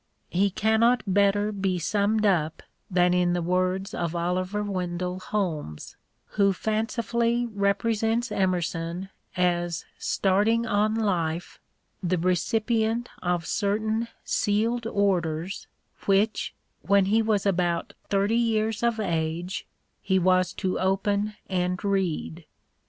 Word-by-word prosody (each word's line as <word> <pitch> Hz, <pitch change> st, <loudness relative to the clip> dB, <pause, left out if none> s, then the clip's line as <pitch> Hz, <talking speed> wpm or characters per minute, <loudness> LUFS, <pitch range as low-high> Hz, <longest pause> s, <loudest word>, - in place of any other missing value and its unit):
He 195 Hz, +3 st, +3 dB
cannot 220 Hz, +5 st, +3 dB
better 200 Hz, +1 st, +2 dB
be 195 Hz, -3 st, -1 dB
summed 210 Hz, +4 st, +1 dB
up 160 Hz, -6 st, +1 dB, 0.3 s
than 180 Hz, -1 st, +3 dB
in 180 Hz, -1 st, +2 dB
the 175 Hz, -, 0 dB
words 185 Hz, +2 st, 0 dB
of 170 Hz, -1 st, -2 dB
Oliver 185 Hz, +4 st, -1 dB
Wendell 180 Hz, -2 st, -3 dB
Holmes, 165 Hz, -, -3 dB, 0.3 s
who 200 Hz, -2 st, +3 dB
fancifully 235 Hz, +3 st, 0 dB
represents 225 Hz, +3 st, 0 dB
Emerson 175 Hz, -1 st, -1 dB, 0.3 s
as 175 Hz, -2 st, 0 dB
starting 210 Hz, +4 st, +2 dB
on 215 Hz, 0 st, +1 dB
life 175 Hz, -6 st, -1 dB, 0.4 s
the 180 Hz, -1 st, 0 dB
recipient 220 Hz, +6 st, 0 dB
of 175 Hz, -2 st, 0 dB
certain 215 Hz, +4 st, 0 dB, 0.2 s
sealed 225 Hz, +3 st, 0 dB
orders 185 Hz, -4 st, 0 dB, 0.4 s
which, 200 Hz, +2 st, +1 dB, 0.3 s
when 200 Hz, 0 st, +3 dB
he 215 Hz, +4 st, +3 dB
was 215 Hz, -3 st, +1 dB
about 175 Hz, -3 st, 0 dB, 0.2 s
thirty 200 Hz, +2 st, +2 dB
years 225 Hz, -2 st, +1 dB
of 235 Hz, -1 st, +1 dB
age, 170 Hz, -1 st, -2 dB, 0.3 s
he 190 Hz, -1 st, +1 dB
was 185 Hz, 0 st, +3 dB
to 185 Hz, -2 st, -2 dB
open 200 Hz, +2 st, 0 dB
and 180 Hz, -1 st, -1 dB
read. 175 Hz, -4 st, -1 dB
195 Hz, 115 wpm, -26 LUFS, 180-215 Hz, 0.4 s, He